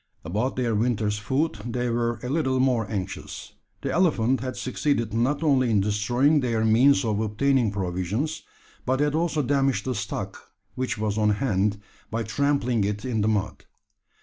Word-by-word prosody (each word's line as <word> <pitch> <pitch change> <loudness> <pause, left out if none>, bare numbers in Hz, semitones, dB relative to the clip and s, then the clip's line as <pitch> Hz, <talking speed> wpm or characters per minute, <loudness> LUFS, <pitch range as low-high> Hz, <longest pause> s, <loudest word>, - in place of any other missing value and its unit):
About 105 +10 -1
their 120 -3 0
winter's 105 -2 0
food 130 +2 -1
they 120 +1 -2
were 120 0 -1
a 125 - -3
little 130 -3 +1
more 125 -5 +1
anxious. 95 -3 -5 0.3
The - - -1
elephant 135 -8 +2
had 130 +1 -5
succeeded 125 -4 -1
not 130 +7 +1
only 135 -5 +3
in 110 -3 +3
destroying 120 +9 +2
their 115 -4 0
means 130 +5 +4
of 105 -2 0
obtaining 115 +3 +1
provisions, 100 - -2 0.4
but 130 +1 0
had 145 0 +1
also 160 -2 0
damaged 135 -5 +1
the 130 - -1
stock 105 -2 -6 0.2
which 130 -2 -2
was 105 0 -1
on 105 0 +3
hand, 105 -2 0 0.3
by 115 +1 -2
trampling 125 -1 +1
it 105 +2 -2
in 115 -4 -1
the 105 - +1
mud. 105 -2 -1
120 Hz, 165 wpm, -25 LUFS, 105-135 Hz, 0.4 s, means